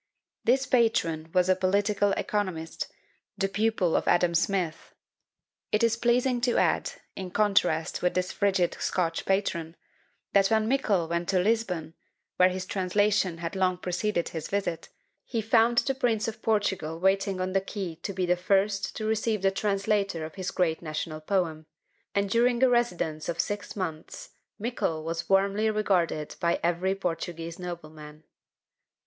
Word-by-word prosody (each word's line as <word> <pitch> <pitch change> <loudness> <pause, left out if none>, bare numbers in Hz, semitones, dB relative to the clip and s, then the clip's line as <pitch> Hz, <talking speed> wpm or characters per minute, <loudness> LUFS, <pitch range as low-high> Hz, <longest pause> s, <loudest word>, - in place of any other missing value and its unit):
This 265 +3 +3
patron 170 - +1
was 180 0 +3
a 185 - +4
political 200 +2 +1
economist, 185 -8 -2 0.5
the 195 - +1
pupil 200 -3 +1
of - - 0
Adam 175 -1 +3
Smith! 170 -1 -1 0.8
It 210 +2 +2
is 230 -1 +3
pleasing 245 +1 +2
to 245 0 +2
add, - - +1 0.2
in 190 -1 -5
contrast 190 -5 +1
with 180 - +1
this 185 0 0
frigid 195 -4 +1
Scotch 165 -3 -1
patron, 170 -4 0 0.6
that 195 -1 +5
when 220 0 +2
Mickle 215 -10 +1
went 170 +1 -2
to 190 - +3
Lisbon, 180 -6 0 0.4
where 185 0 +6
his 185 0 -4
translation 195 -1 +1
had 165 +2 -5
long 185 -1 +1
preceded 180 0 -1
his 160 -2 -5
visit, 195 -5 -2 0.3
he 235 - -3
found 225 +2 +3
the 270 - +3
Prince 230 -5 0
of 220 0 -5
Portugal 190 -7 0
waiting 195 +1 +1
on 185 0 -2
the 195 - +3
quay 195 -3 -5
to 200 - -3
be 185 -1 -1
the 180 0 +3
first 195 +2 +1
to 215 - -4
receive 220 -1 0
the 195 - +4
translator 195 -3 0
of 155 - -9
his 185 -1 -4
great 165 -3 0
national 155 -1 -4
poem; 160 -3 -1 0.5
and 200 0 +2
during 235 +4 +2
a 260 - +6
residence 175 -11 0
of 170 - -3
six 205 -2 -2
months, 165 -6 -5 0.3
Mickle 205 -8 -2
was 165 +1 -4
warmly 200 +3 +3
regarded 185 -8 0
by 170 0 +1
every 175 +3 +1
Portuguese 165 -2 -4
nobleman. 155 -3 -8
190 Hz, 155 wpm, -27 LUFS, 170-210 Hz, 0.8 s, where